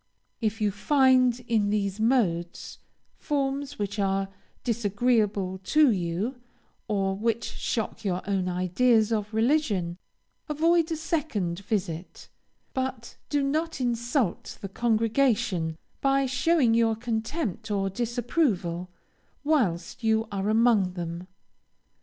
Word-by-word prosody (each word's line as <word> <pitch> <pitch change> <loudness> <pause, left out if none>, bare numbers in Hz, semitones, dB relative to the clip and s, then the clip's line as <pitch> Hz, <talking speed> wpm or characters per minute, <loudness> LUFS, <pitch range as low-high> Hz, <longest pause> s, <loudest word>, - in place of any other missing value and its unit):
If 220 0 -1
you 210 -1 +2
find, 255 +2 +3
in 220 -4 +1
these 200 -1 -1
modes, 195 -8 0 0.4
forms 280 -1 -2
which 205 0 -3
are 195 0 0 0.3
disagreeable 210 -4 +1
to 295 +8 +4
you, 195 +7 -2 0.5
or 195 -3 0
which 230 +2 -1
shock 225 -1 -3
your 185 -3 -1
own 190 -2 0
ideas 215 +6 +2
of 210 -1 -2
religion, 220 - +1 0.5
avoid 330 +2 +3
a - - +1
second 295 - -2
visit, 185 -4 -4 0.4
but 260 -3 -3
do 290 -1 +1
not 310 +3 -1
insult 240 - -1
the 195 - -6
congregation, 225 - +1 0.2
by 275 0 +3
showing 270 -1 +2
your 225 -1 +3
contempt 225 - -3
or 195 -2 0
disapproval, 225 - -1 0.5
whilst 230 - 0
you 220 0 +2
are 200 +1 -1
among 215 -4 +3
them. 170 0 -5
225 Hz, 110 wpm, -27 LUFS, 195-260 Hz, 0.5 s, to